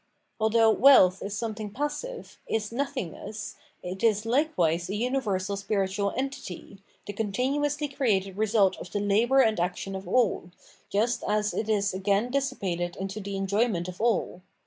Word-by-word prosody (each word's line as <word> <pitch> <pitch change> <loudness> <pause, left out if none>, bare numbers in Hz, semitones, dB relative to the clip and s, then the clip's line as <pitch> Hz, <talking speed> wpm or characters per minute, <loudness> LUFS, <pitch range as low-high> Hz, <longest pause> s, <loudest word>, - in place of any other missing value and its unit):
Although 220 +1 +4
wealth 215 -8 +6
is 200 +1 -4
something 215 -2 -4
passive, 295 - -5
is 215 -1 -2
nottungness, 230 - -4 0.3
it 185 +2 -6
is 215 -1 +3
likewise 205 - +1
a 200 - -2
universal 210 -5 -1
spiritual 200 0 -1
entity, 255 -8 -5 0.3
the 205 - -5
continu 250 +8 -1
ously 290 +1 0
created 205 -9 0
result 205 -2 +2
of 180 - -9
the - - -2
labo'or 225 +7 +3
and 220 -4 +1
action 180 +2 -2
of 190 0 -7
aU, 230 -7 +1 0.4
just 225 +5 0
as 210 0 +1
it 220 - -2
is 200 -2 +1
again 200 +5 0
dissipated 195 -11 -2
into 195 +2 -5
the 200 -1 -5
enjoyment 195 -2 0
of 180 +2 -7
all. 225 -5 0
210 Hz, 150 wpm, -27 LUFS, 195-245 Hz, 0.4 s, wealth